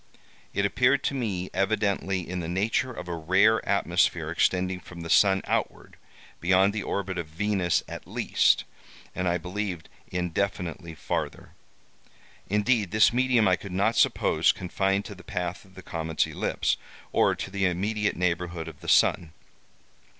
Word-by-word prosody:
It 100 - 0
appeared 125 +6 +2
to - - 0
me 100 -9 -3
evidently 95 -2 0
in 90 +1 -4
the 85 - -4
nature 105 +8 0
of 90 -7 -8
a 85 - -3
rare 95 +7 +3
atmosphere 85 -4 +1
extending 90 +2 +1
from 85 -1 -11
the 85 - -5
sun 95 -2 +4
outward, - - -2 0.4
beyond 95 +3 +3
the 110 - -2
orbit 95 -2 -3
of 85 - -4
Venus 90 +2 0
at - - -8
least, - - +2 0.5
and 90 - -2
I 90 0 +2
believed 90 -1 -5 0.2
indefinitely 90 -1 -3
farther.(*2) - - -4 1.0
Indeed, 105 0 +2
this 110 +3 +4
medium 125 -3 +3
I 90 - +4
could 100 +1 -10
not 100 +5 +1
suppose - - +3
confined 95 +2 -1
to - - -7
the 95 - -14
path 90 +2 -4
of 95 -1 -21
the 95 - -11
comet's 80 -1 -1
ellipse, - - -1 0.3
or - - +3
to - - -6
the 100 -1 0
immediate 105 +4 -1
neighborhood 85 -2 -2
of 80 -3 -10
the - - -6
sun. 80 -2 +3
95 Hz, 155 wpm, -26 LUFS, 90-105 Hz, 1.0 s, sun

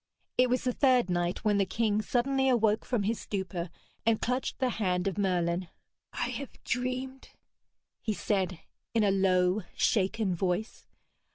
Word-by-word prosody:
It 250 0 +4
was 250 +1 +1
the 250 -1 0
third 250 -8 +3
night 175 +3 -1
when 205 -1 +3
the 195 - +3
king 215 +1 +1
suddenly 265 +4 +1
awoke 220 -3 +2
from 240 -5 0
his 220 +3 0
stupor 190 -3 -4 0.3
and 225 -1 +3
clutched 250 +2 -1
the 260 -2 +1
hand 180 -2 +1
of 195 - -1
Merlin. 180 -3 0 0.5
'I - - -1
have 280 - -10
dreamed!' 255 +2 -3 0.7
he 215 - -1
said 185 -5 -1 0.3
in 225 - +4
a 200 - +4
low 185 0 +3
shaken 195 -1 +1
voice. 180 +4 -2
210 Hz, 155 wpm, -30 LUFS, 185-245 Hz, 0.7 s, It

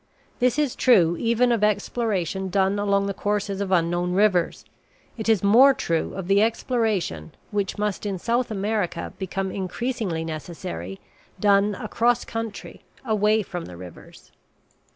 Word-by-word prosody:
This 250 +1 +2
is 295 -4 0
true 175 -10 +4
even 235 +1 +2
of 230 -3 +1
exploration 200 -3 -1
done 195 +2 +1
along 200 -1 +1
the 200 - -2
courses 205 0 -2
of 195 -1 -3
unknown 175 0 +1
rivers; 190 -3 +2 0.5
it 225 -1 -3
is 220 -4 +3
more 255 +7 +6
true 165 -11 -2
of 190 -2 -5
the 200 +1 +4
exploration, 220 - -1 0.2
which 200 -2 -2
must 210 0 -2
in 195 -2 -2
South 235 +6 0
America 205 -4 -2
become 190 0 -3
increasingly 195 -3 -3
necessary, 120 - -6 0.4
done 200 +1 +3
across 235 +3 0
country, 225 -2 -6 0.2
away 215 -1 +2
from 175 -2 -6
the 90 - -10
rivers. 90 -1 -13
200 Hz, 140 wpm, -24 LUFS, 180-225 Hz, 0.5 s, more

